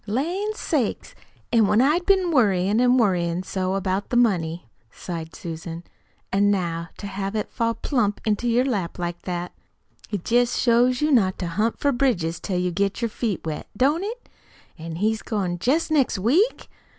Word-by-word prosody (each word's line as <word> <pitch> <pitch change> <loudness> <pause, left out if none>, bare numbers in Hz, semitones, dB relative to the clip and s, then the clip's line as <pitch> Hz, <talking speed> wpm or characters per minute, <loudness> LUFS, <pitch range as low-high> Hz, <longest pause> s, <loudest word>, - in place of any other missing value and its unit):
"Lan' 350 - -1
sakes! - - -2 0.4
An' 225 -3 +5
when 210 - +3
I'd 305 +7 +2
been 380 -3 +3
worryin' 205 - +3
an' 250 0 +4
worryin' 180 -6 +1
so 185 0 -2
about 195 +1 -1
the 240 - +1
money," 175 - +1 0.2
sighed 165 -2 -7
Susan; 165 0 -7 0.5
"an' 200 +1 +3
now 170 -4 -1
to - - -8
have 195 +1 -4
it 215 - -2
fall 230 0 0
plump 220 -7 0
into 215 +2 0
your 245 +2 +3
lap 200 -10 -2
like 175 -1 -4
that. 175 -1 -4 0.6
It 205 -5 -4
jest 245 +1 +2
shows 245 +2 +3
you 300 +1 +2
not 195 -8 +3
to 180 - -3
hunt 215 +7 0
for 285 - +1
bridges 195 -12 0
till 185 -3 -3
you 180 0 0
get 200 +6 -1
your 230 - +1
feet 215 -6 -3
wet, 155 -2 -4
don't 295 - +2
it? 460 +4 -6 0.5
An' 160 0 -7
he's 220 +5 0
goin' 185 -6 -2
jest 300 - +1
next 275 -8 +2
week?" 305 - +2
205 Hz, 175 wpm, -24 LUFS, 180-250 Hz, 0.6 s, An